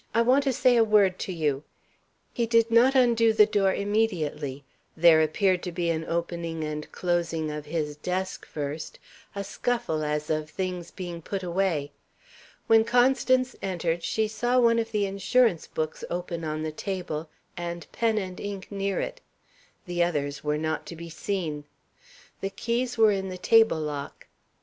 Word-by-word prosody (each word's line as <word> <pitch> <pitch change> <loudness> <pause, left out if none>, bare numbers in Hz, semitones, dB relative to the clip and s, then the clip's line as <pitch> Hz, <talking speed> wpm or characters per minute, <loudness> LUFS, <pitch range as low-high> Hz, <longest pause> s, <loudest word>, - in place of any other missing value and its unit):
I 230 - +5
want 260 +4 +4
to 270 - +3
say 250 0 +3
a 230 - +6
word 205 -4 +3
to - - -3
you." 150 -5 -1 0.7
He 235 -1 0
did 230 0 +3
not 245 +4 +5
undo 235 -3 +4
the 210 - +7
door 200 -2 +2
immediately. 170 -10 -1 0.3
There 160 -1 +7
appeared 180 +4 +2
to 180 - -4
be 170 -1 0
an 160 0 -2
opening 170 -1 -3
and 150 0 -5
closing 165 -3 -1
of 150 0 -6
his 150 -2 -3
desk, 185 +4 -3
first 150 +1 -5 0.4
a 200 - -3
scuffle, 230 -6 -2
as 150 0 -2
of 155 0 -1
things 180 0 -4
being 175 -3 -7
put 190 +3 -4
away. 175 -5 0 0.7
When 225 0 +5
Constance 255 +2 +3
entered, 175 -3 -1
she 220 +5 0
saw 240 +3 +1
one 230 -1 +4
of 225 0 -3
the 210 -2 +1
insurance 200 0 +2
books 155 0 -4
open 175 -1 -4
on 155 0 -3
the 155 - -2
table, 165 -3 -4 0.3
the 170 -1 -5
pen 225 -2 +1
and 185 -3 -4
ink 200 -1 -6
near 195 -1 -1
it; - - -5 0.6
the 175 -1 +1
others 145 -4 -2
were 150 0 0
not 155 0 -2
to 170 - -7
be 170 0 -9
seen. 160 -5 -3 0.8
The 195 - -2
keys 235 +5 -2
were 220 -1 +6
in 190 -1 -2
the 185 - -6
table 225 -2 +4
lock. 145 -2 -5
180 Hz, 170 wpm, -27 LUFS, 160-220 Hz, 0.8 s, the